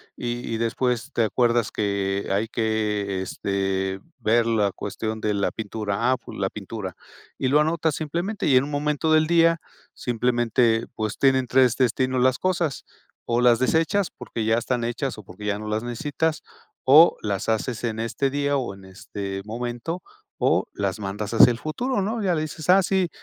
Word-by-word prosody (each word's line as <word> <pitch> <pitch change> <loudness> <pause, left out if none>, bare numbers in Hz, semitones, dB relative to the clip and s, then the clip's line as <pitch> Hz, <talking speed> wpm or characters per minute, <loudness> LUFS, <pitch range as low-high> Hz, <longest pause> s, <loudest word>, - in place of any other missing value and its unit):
Y 120 -1 -4
y - - -1
después 115 +1 -1
te 115 - +1
acuerdas 120 +1 +1
que 100 -1 -1
hay 105 +3 +1
que, 105 -4 -1
este, 95 0 -2 0.2
ver 115 0 +3
la 110 -3 +2
cuestión 110 +3 -4
de 105 -1 0
la 100 -1 0
pintura: 110 +1 -2
"Ah, - - +4
pues 125 - -11
la 95 -1 0
pintura", 100 -2 -7 0.4
y 130 - 0
lo 145 +3 +5
anotas 160 0 +1
simplemente, 170 +7 -3
y 135 - +4
en 130 - +5
un 145 - -5
momento 150 +2 0
del 155 0 +4
día 165 0 +4 0.3
simplemente, 120 -1 +1
pues, 110 -1 -3
tienen 130 -2 +3
3 125 -1 +4
destinos 130 0 +1
las 130 0 +3
cosas, 170 -6 -1 0.4
o 120 +1 +1
las 120 -1 +5
desechas 165 +8 +2
porque 115 - -5
ya 110 +1 +3
están 120 0 -2
hechas 120 +3 -3
o 105 - -10
porque 95 +2 -11
ya 100 0 0
no 110 - -6
las 105 +1 -1
necesitas, 145 +6 -2 0.4
o 150 +6 +7
las 100 +1 -2
haces 110 +2 -1
en 110 -2 -2
este 115 +4 -1
día 145 +1 0
o 125 -7 -3
en 95 -1 -15
este 95 +1 -6
momento, 120 - -4 0.4
o - - +2
las 100 0 -2
mandas 105 +2 -4
hacia 120 +2 +8
el 120 - -3
futuro, 225 +9 -2
¿no? 220 +3 -2
Ya 180 -3 +2
le 155 - -1
dices: 155 +1 -7
"Ah, 190 +2 +7
sí, 190 -1 +1
120 Hz, 185 wpm, -24 LUFS, 105-145 Hz, 0.4 s, hacia